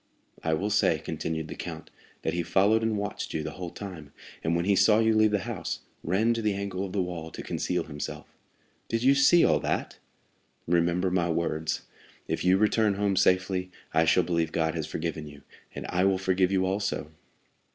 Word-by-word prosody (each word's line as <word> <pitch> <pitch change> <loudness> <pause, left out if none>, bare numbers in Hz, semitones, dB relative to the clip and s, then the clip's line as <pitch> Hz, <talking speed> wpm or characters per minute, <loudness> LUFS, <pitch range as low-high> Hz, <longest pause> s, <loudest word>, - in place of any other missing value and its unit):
"I 80 -1 +1
will 100 +6 -2
say," 105 - +3
continued 80 -1 -4
the - - -6
count, - - -7 0.3
"that - - -1
he 85 - 0
followed 100 +6 +3
and 110 -1 0
watched 100 0 -4
you 80 - -1
the - - -4
whole 90 -2 -6
time, 85 -7 -9 0.3
and 80 +1 +1
when 85 +1 0
he 100 0 +3
saw 105 +2 +5
you 110 0 +3
leave 110 0 +4
the 105 -2 0
house, - - -4 0.2
ran 105 +7 +2
to 115 - -2
the 105 -2 0
angle 100 -1 -3
of 95 - -5
the 95 -1 0
wall 85 -3 -5
to - - -8
conceal - - -1
himself." 75 -2 -6 0.6
"Did 115 +1 -1
you 135 +2 +6
see 140 +5 +6
all - - +3
that?" - - -2 0.7
"Remember 85 +2 +1
my 85 -2 +1
words: 80 -1 -1 0.4
'If - - -2
you 90 +1 +5
return 105 0 +2
home 100 -1 +1
safely, 90 0 +2 0.2
I 80 0 +4
shall 90 +3 +4
believe 85 -2 0
God 80 -1 0
has 80 -3 -3
forgiven 80 -2 -4
you, 70 -1 -13 0.3
and - - -5
I 90 +1 +2
will 95 -1 +3
forgive 95 0 +1
you 95 -1 +2
also. 95 -5 -2
95 Hz, 200 wpm, -27 LUFS, 85-100 Hz, 0.7 s, you